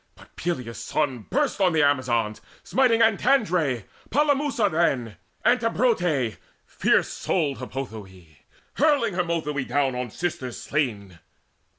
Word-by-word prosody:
But - - -19
Peleus' 125 -9 -4
son 130 -7 -2
burst 275 -6 0
on 185 -3 +4
the 155 -2 +3
Amazons 120 -6 +1 0.2
Smiting 245 -4 +3
Antandre, 195 - +2 0.3
Polemusa 285 -6 +2
then, 130 - 0 0.3
Antibrote, 200 - +2 0.3
fierce - - +1
souled 150 -7 -1
Hippothoe, 105 - -8 0.4
Hurling 285 - +3
Harmothoe 165 -5 -1
down 140 -2 +1
on 125 0 -3
sisters 130 -4 -4
slain. 105 - -2
150 Hz, 105 wpm, -25 LUFS, -, 0.4 s, on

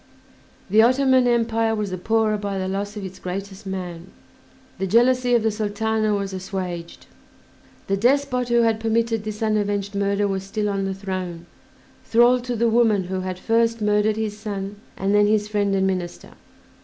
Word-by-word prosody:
The 215 +2 +6
Ottoman 255 +1 +4
Empire 225 -1 +1
was 210 -3 -3
the 185 - -3
poorer 220 +2 +1
by 200 -1 -3
the 185 0 -2
loss 200 +2 -3
of 200 - -5
its 185 0 -9
greatest 195 +2 -6
man, 180 -2 -5 0.7
the 190 - -1
jealousy 245 +4 +3
of 235 - +2
the 220 - +2
Sultana 215 0 0
was 200 -1 -3
assuaged, 185 -3 -5 0.8
the 195 - 0
despot 250 +2 +1
who 235 0 +4
had 225 -1 +2
permitted 225 0 0
this 215 0 -5
unavenged 205 -2 0
murder 200 0 +1
was 195 -1 -2
still 210 +2 -2
on 195 -1 -1
the 190 0 -3
throne, 185 -3 -5 0.6
thrall 240 +2 +4
to 245 0 -4
the 235 +1 +2
woman 225 -4 +3
who 185 +1 -3
had 185 0 -4
first 230 +3 +1
murdered 210 0 +2
his 215 -1 -3
son 205 -2 -5 0.2
and 195 +1 0
then 205 0 +5
his 210 0 +2
friend 205 -2 0
and 190 0 +2
minister. 185 -2 -3
210 Hz, 175 wpm, -22 LUFS, 195-225 Hz, 0.8 s, The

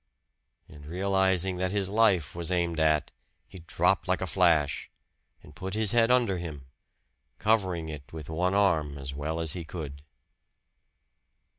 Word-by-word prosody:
And 75 -2 -14
realizing 95 +1 +2
that 95 0 -1
his 100 0 0
life 95 -8 +2
was 85 +1 -4
aimed 85 -2 0
at, 75 -2 +2 0.4
he 95 - -12
dropped 85 - 0
like - - +1
a - - -2
flash, 85 -6 +1 0.5
and 75 - -16
put 95 +1 -5
his 110 -2 +3
head 115 -1 +4
under 120 -7 +2
him, 75 -6 -7 0.7
covering 95 -7 0
it 75 -3 -9
with 80 -3 -8
one 90 +4 -1
arm 80 -8 +1
as 70 -1 -6
well 75 +3 -3
as 80 -1 +3
he 90 - -5
could. 75 -4 -8
85 Hz, 150 wpm, -28 LUFS, 75-95 Hz, 0.7 s, head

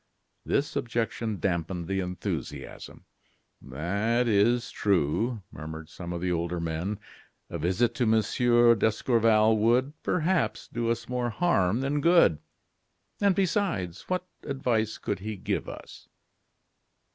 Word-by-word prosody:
This 145 - 0
objection 115 -5 -2
dampened 85 0 -2
the 95 +1 -1
enthusiasm. 90 -6 -5 0.6
"That 100 - -1
is 115 +3 +2
true," 100 - 0
murmured 80 +1 -8
some 85 +1 -7
of 85 -1 -4
the 90 0 0
older 85 0 -1
men; 85 +5 -3 0.5
"a - - -4
visit 95 +9 +1
to 120 0 0
Monsieur 120 +2 +4
d'Escorval 110 0 +3
would, 125 +6 +2
perhaps, 180 +1 0
do 115 0 -2
us 115 -1 -2
more 125 -1 -1
harm 115 - +1
than 145 +2 0
good. 170 - +5 0.8
And, 200 -2 +4
besides, 175 - -1
what 185 0 -1 0.2
advice 120 -6 -1
could 100 - -3
he 105 +1 -5
give - - -2
us?" - - -11
110 Hz, 120 wpm, -27 LUFS, 90-125 Hz, 0.8 s, good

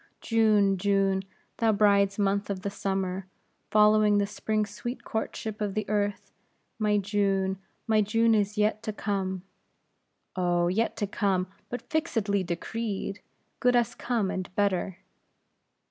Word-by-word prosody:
"June! 210 -4 +3
June! 195 -1 +2 0.4
thou 225 -1 +3
bride's 200 -1 +3
month 200 0 0
of 195 -2 -3
the 200 - -2
summer, 190 -1 -2 0.4
following 210 0 +5
the 200 - +2
spring's 215 0 -2
sweet 240 +4 -6
courtship 220 -1 -4
of 205 -2 -2
the 215 - -2
earth, 205 -1 -1 0.5
my 210 -1 +2
June, 195 -1 0 0.3
my 220 -2 +3
June 225 +2 +3
is 210 0 +1
yet 210 0 +1
to 225 -1 -3
come!" 190 -3 -2 0.9
"Oh! 175 -1 +1
yet 220 +6 0
to 205 - 0
come, 195 -2 0 0.2
but 245 -1 -5
fixedly 220 - 0
decreed; 200 +3 -3 0.4
good 250 0 +3
as 240 -3 +2
come, 230 -6 -1
and 185 -1 -4
better." 190 -2 0
205 Hz, 135 wpm, -28 LUFS, 195-215 Hz, 0.9 s, following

